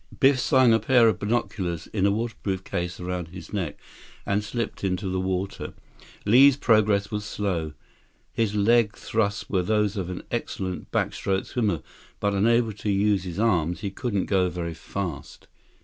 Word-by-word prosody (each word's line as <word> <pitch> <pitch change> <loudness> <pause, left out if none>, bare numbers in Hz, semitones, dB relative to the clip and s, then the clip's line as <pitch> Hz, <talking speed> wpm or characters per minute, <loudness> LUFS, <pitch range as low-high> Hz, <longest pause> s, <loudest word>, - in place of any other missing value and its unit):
Biff 135 -1 +5
slung 130 -4 +4
a 115 - +4
pair 125 -2 +5
of 110 - +1
binoculars 100 -6 -2
in 100 -2 +2
a - - +3
waterproof 100 -3 -3
case 85 -1 -4
around 90 -1 -3
his 90 +1 -11
neck 90 -8 -3 0.5
and 100 +1 0
slipped 115 0 -4
into 95 +1 -1
the 95 0 -1
water. 95 +1 -3 0.5
Li's 130 +6 +7
progress 105 -5 +3
was 105 -1 -2
slow. 90 -8 -2 0.6
His 110 -2 0
leg 105 +1 +3
thrusts 105 -1 -1
were 95 -3 +1
those 105 +2 +1
of 90 -2 -3
an 90 - -6
excellent 95 -1 -4
backstroke 95 -1 -1
swimmer, 100 - -1 0.4
but 100 0 0
unable 115 +3 +2
to 105 +1 -4
use 100 -1 +2
his 90 -2 -6
arms, 90 -7 +1
he 100 - -3
couldn't 100 -2 -2
go 95 -2 +2
very 85 -1 -4
fast. 85 -2 -6
100 Hz, 165 wpm, -25 LUFS, 90-110 Hz, 0.6 s, Li's